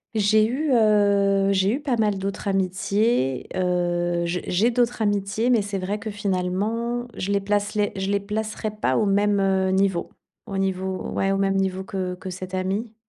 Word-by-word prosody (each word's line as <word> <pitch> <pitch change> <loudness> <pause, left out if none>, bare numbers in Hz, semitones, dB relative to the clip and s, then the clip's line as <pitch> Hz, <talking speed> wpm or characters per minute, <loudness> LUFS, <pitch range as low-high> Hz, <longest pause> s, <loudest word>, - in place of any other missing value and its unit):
J'ai 215 +1 +4
eu, 280 +4 -1
heu, 200 -3 +3
j'ai 195 +3 +2
eu 275 - -4
pas 265 -5 0
mal 210 -3 +1
d'autres 195 +1 -4
amitiés. 195 - 0
Heu, 175 -1 0
j'ai 175 +1 -2
j'ai 215 +7 +2
d'autres 240 -1 +1
amitiés, 205 +4 0
mais 230 -4 +4
c'est 200 -1 -4
vrai 195 +3 -3
que 215 +1 -5
finalement, 205 +5 -2
je 195 +2 -3
les 200 - +2
placerais, 205 +1 0
je 190 0 -2
les 200 0 +2
placerais 215 +1 -3
pas 215 - 0
au 215 - +2
même, 205 +1 +2
heu, 190 -1 +2
niveau, 190 -2 +1 0.4
au 195 - -4
niveau, 190 -1 -2
ouais, 195 0 0
au 195 - +1
même 195 0 +1
niveau 190 0 -1
que 185 -2 -4
que 185 0 -7
cette 185 +1 -6
amie. 200 +5 -2
200 Hz, 185 wpm, -24 LUFS, 190-215 Hz, 0.4 s, J'ai